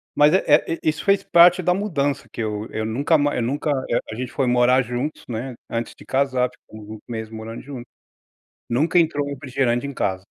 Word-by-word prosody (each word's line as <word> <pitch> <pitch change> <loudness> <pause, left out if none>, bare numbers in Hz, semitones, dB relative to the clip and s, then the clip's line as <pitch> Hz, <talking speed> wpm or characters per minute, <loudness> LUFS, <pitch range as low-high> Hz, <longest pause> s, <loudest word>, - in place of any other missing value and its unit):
mas, 150 +1 +5
eh 190 - +3
eh, 150 +2 +4
i - - +3
isso 155 0 -3
fez 200 0 +3
parte 175 +1 +6
da 180 - +2
mudança, 155 -9 -1
que - - -5
eu 105 0 -3
eu 110 - -3
nunca 140 +9 +1
ma 145 0 +1
eu - - 0
nunca, 145 +5 -1 0.2
eh, 120 - +2
a - - -5
gente 125 +2 -5
foi 135 - 0
morar 125 +1 +4
juntos, 125 +5 -4
né, 125 +3 -4 0.2
antes 115 0 -3
de - - -15
casar, 130 -2 +1
ficamos 110 -1 -14
uns - - -20
meses 110 -2 -6
morando 110 +1 -7
juntos. 130 -3 -8 0.8
Nunca 155 +9 +2
entrou 150 -3 0
refrigerante 130 -3 -1
em 140 - -5
casa. 95 -4 -2
130 Hz, 210 wpm, -22 LUFS, 115-150 Hz, 0.8 s, parte